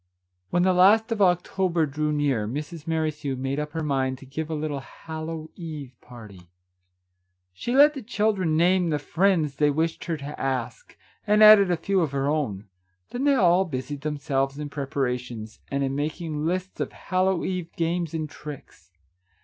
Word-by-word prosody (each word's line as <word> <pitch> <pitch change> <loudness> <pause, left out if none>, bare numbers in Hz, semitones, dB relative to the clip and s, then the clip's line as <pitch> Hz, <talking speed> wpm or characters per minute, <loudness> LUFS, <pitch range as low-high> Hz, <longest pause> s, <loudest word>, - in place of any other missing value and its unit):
When 175 - +2
the 185 0 +4
last 210 +5 +5
of 220 -2 -1
October 180 -2 +2
drew 150 +1 -2
near, 140 -8 0
Mrs. 150 +6 -6
Merrithew 155 -4 -1
made 135 +2 -2
up 150 0 -4
her 160 -1 -2
mind 135 -3 0
to 135 - -13
give 150 +4 -5
a 160 - -2
little 150 -2 -3
Hallow 160 +2 -7
eve 155 -7 -7
party. 105 -7 -13 1.1
She 240 - -3
let 290 +2 +7
the 275 - -6
children 205 -7 0
name 180 +1 +3
the 150 - +1
friends 160 -2 +1
they 150 0 +3
wished 160 +3 -1
her 165 -2 -2
to 145 +1 -7
ask, 130 -3 -3 0.3
and 210 +1 +5
added 215 -3 +9
a 175 - +1
few 190 +3 +1
of 150 -4 -1
her 135 0 0
own; 125 -10 -1 0.4
then 255 +3 -2
they 285 -1 +5
all 185 -5 +4
busied 140 -3 -5
them 150 0 -3
selves 135 0 -1
in 150 -1 -5
preparations, 125 -6 -4
and 140 0 -1
in 135 0 -1
making 155 +1 -3
lists 185 +2 -3
of - - -2
Hallow 185 -1 0
eve 180 -3 -3
games 170 -1 -1
and 155 -1 -2
tricks. 145 - -11
155 Hz, 175 wpm, -25 LUFS, 140-180 Hz, 1.1 s, added